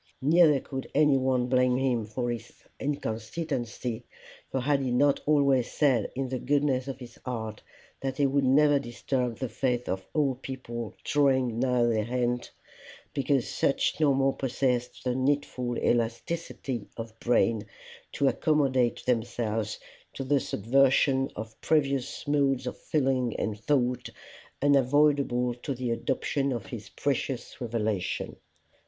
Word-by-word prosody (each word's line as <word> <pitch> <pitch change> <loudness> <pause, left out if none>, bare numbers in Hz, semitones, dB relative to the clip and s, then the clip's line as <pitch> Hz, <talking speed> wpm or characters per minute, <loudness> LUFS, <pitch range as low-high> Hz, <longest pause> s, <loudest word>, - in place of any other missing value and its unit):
Neither 155 0 +5
could 135 0 -6
anyone 130 -4 +3
blame 125 0 +3
him 125 -5 0
for 120 +2 -2 0.4
inconsistency; 120 -2 -3 0.5
for 135 - 0
had 140 +2 +2
he 135 -2 -1
not 140 +3 +3
always 140 -4 +3
said 130 -7 +2
in 135 0 -2
the 130 -1 -2
goodness 140 -1 +1
of 135 - -4
his 120 -3 -12
heart, 110 -4 -5 0.4
that 135 -1 -3
he 145 - +3
would 140 +1 +2
never 145 +2 +5
disturb 125 -1 -2
the 130 - -2
faith 125 +1 -1
of 95 0 -2
old 135 -4 +1
people 120 -4 -6
drawing 130 -5 +2
nigh 125 -1 +2
their 110 -2 +1
end, 125 -1 -1 0.6
because 135 -2 +1
such 140 - 0
no 145 -3 +4
more 135 0 +2
possessed 125 -2 -1
the 125 - 0
needful 130 -2 0
elasticity 120 0 -2
of 115 -1 -7
brain 115 -3 +2 0.5
to 140 - +2
accommodate 135 -5 +1
themselves 115 -3 -1 0.4
to 135 - -4
the 140 +1 +2
subversion 135 +4 +2
of 110 +1 -8
previous 140 -2 0
modes 140 -3 +2
of 125 - -3
feeling 130 -5 0
and 105 -2 -2
thought, 125 +1 0 0.5
unavoidable 140 -2 +3
to 125 +3 -5
the 125 -1 -2
adoption 135 +3 -1
of 120 -6 -3
his 110 -2 -8
precious 135 -2 -3
revelation. 110 -5 -2
130 Hz, 135 wpm, -28 LUFS, 120-140 Hz, 0.6 s, Neither